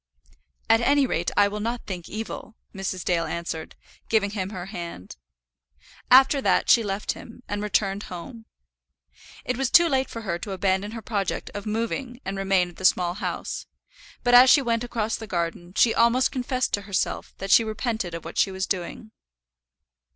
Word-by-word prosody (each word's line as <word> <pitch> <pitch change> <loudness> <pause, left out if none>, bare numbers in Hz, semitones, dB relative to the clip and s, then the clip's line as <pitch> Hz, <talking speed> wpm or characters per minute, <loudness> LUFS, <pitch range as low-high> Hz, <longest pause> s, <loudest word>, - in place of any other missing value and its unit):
"At 225 +1 +5
any 280 +3 +4
rate 175 -8 -1
I 205 0 +6
will 210 +1 -4
not 235 +3 -3
think 180 -3 -6
evil," 220 0 -6 0.2
Mrs. 190 -2 -4
Dale 170 -2 +1
answered, 170 -2 -5 0.3
giving 210 -3 +2
him 195 -3 -3
her 185 -3 -6
hand. 170 - -8 0.9
After 270 +2 +6
that - - +3
she 235 - +6
left 205 -1 -2
him, 245 +2 -11
and 205 0 -3
returned 200 -1 0
home. 225 +6 -9 1.0
It 250 - -1
was 265 -1 0
too 340 +4 +7
late 265 -3 0
for 230 - -6
her 175 -5 -3
to 195 +2 -5
abandon 190 +2 0
her 225 -1 -7
project 200 -3 -2
of 205 +1 -6
moving 230 +3 -3
and 195 - -3
remain 195 -2 +2
at 175 - -17
the 190 - -4
Small 175 -1 +3
House; 195 - -4 0.6
but 245 - +2
as 250 +1 +9
she 280 +2 +6
went 230 -1 0
across 225 -2 -2
the 220 - -8
garden 175 -1 -3
she 230 - +4
almost 235 +2 +3
confessed 255 -1 -1
to 205 - +1
herself 195 - -2
that 195 0 -4
she 230 - +7
repented 220 -4 -3
of 165 - -8
what 165 - -4
she - - +4
was 190 0 -3
doing. 195 +4 -4
210 Hz, 180 wpm, -25 LUFS, 190-235 Hz, 1.0 s, as